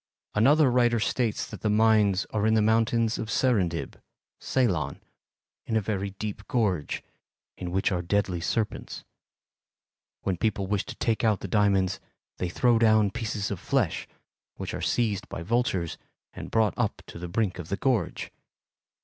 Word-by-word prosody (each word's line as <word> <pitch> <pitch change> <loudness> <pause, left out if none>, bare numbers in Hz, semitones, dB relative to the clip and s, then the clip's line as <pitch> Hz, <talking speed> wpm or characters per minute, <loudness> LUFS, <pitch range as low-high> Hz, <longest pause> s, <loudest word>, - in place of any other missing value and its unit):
"Another 135 +5 +5
writer 120 -1 +3
states 115 0 0
that - - -10
the 110 - +1
mines 105 -2 +4
are 110 0 +1
in 110 - +4
the 110 - +4
mountains 115 +1 +2
of 110 - -4
Serendib 100 -9 0 0.4
(Ceylon) 90 - 0 0.7
in 110 - +1
a - - +4
very 100 -2 -2
deep 105 +1 -5
gorge, 105 - 0 0.5
in 90 - -5
which 95 +3 +1
are 90 -2 0
deadly 90 -1 0
serpents. 110 +5 -2 1.2
When 95 -2 -1
people 100 0 0
wish 100 +1 -1
to - - -6
take 115 -1 0
out 110 -3 +2
the - - -4
diamonds 100 -2 +2 0.4
they 90 - -1
throw 120 +5 +3
down 110 -3 +4
pieces 105 -2 -3
of 100 - -3
flesh, - - 0 0.5
which - - -5
are - - -4
seized 105 -5 0
by 85 - -5
vultures 95 -5 0 0.3
and - - -7
brought 110 -5 +2
up - - -1
to - - -10
the 90 - -5
brink 95 -1 -1
of 85 - -7
the 100 - -1
gorge. 120 -9 -1
105 Hz, 160 wpm, -27 LUFS, 95-115 Hz, 1.2 s, Another